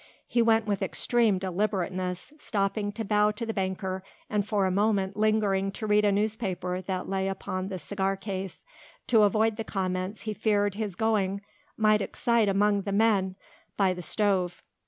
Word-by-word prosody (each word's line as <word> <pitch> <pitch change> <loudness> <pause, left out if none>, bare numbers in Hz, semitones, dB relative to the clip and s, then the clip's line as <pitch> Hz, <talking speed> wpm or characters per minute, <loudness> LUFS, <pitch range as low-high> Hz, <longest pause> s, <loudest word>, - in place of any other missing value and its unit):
He 240 - +2
went 225 -1 +3
with 205 -2 -1
extreme 230 -5 +2
deliberateness, 185 - -2
stopping 205 -2 -1
to 225 +1 -4
bow 210 +1 +3
to 230 +2 -4
the 225 - -3
banker, 190 -1 -2 0.3
and 210 -1 +1
for 205 -3 +1
a 185 - +1
moment 200 0 +1
lingering 210 -2 +1
to 220 - -5
read 210 0 +3
a 205 - +4
newspaper 200 -3 -1
that 185 -1 -3
lay 195 0 -1
upon 185 -1 -3
the 190 -1 -4
cigar 195 +2 -2
case, 195 -1 -5 0.4
to 225 -3 +4
avoid 215 +1 +3
the 225 - -2
comments 185 0 -3
he 215 -1 -3
feared 205 -2 +1
his 205 -3 -4
going 200 -2 0 0.4
might 215 -1 +4
excite 230 +1 +1
among 205 +1 +2
the 200 - -4
men 200 -3 +2 0.4
by 195 -2 +3
the 180 - -7
stove. 185 -2 0
200 Hz, 170 wpm, -28 LUFS, 190-215 Hz, 0.4 s, a